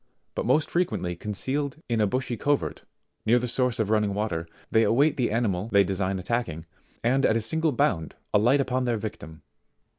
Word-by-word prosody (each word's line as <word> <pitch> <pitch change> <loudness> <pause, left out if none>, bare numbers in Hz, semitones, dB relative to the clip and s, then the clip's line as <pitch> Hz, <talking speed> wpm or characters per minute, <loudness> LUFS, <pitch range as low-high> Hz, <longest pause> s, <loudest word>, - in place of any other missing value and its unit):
69 - - -3
most 155 - +2
frequently 170 - 0
concealed 130 - -2
in 115 -2 +1
a 105 - +3
bushy 125 +3 -2
covert, 145 +5 -1 0.4
near 115 +3 +4
the 125 0 -1
source 125 0 +1
of 110 -2 0
running 105 -2 +2
water, 85 -6 -2 0.2
they 110 - +4
await 140 +7 +3
the 125 -3 0
animal 105 -3 0
they 100 -1 +6
design 95 0 -1
attacking, 90 -5 -2 0.4
and 130 +4 +2
at 110 - +4
a - - +1
single 160 +8 +1
bound 80 - 0 0.2
alight 120 +7 +4
upon 130 -1 -1
their 120 -2 +1
victim. 100 -8 -7
115 Hz, 180 wpm, -26 LUFS, 100-130 Hz, 0.4 s, they